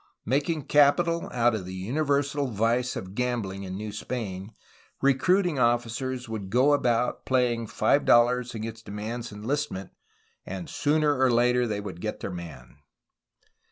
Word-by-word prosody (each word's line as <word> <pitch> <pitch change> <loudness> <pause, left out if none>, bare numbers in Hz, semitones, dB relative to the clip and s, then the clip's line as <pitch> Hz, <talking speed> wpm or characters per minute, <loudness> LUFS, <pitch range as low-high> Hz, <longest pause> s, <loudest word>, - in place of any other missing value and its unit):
Making 145 +5 0
capital 165 +5 +3
out 120 -1 +2
of 100 -4 -4
the 95 - -6
universal 140 +6 0
vice 120 +3 0
of 95 0 -6
gambhng 110 -5 -2
in 95 0 -5
New 105 +1 -5
Spain, 105 -4 -5 0.4
recruiting 150 +4 +2
officers 120 +1 0
would 110 -4 -5
go 130 +7 +4
about 125 -3 +1
playing 120 -3 +1
five 140 - +2
dollars 120 +1 +3
against 110 0 -6
a - - -6
man's 115 +3 -5
enlistment, 105 -2 -3 0.5
and 95 -2 -6
sooner 150 -1 +1
or 130 -1 +4
later 125 +1 +3
they 105 -2 -2
would 95 -4 -7
get 105 - -4
their - - -5
man. 70 -8 -9
120 Hz, 145 wpm, -27 LUFS, 105-135 Hz, 0.5 s, go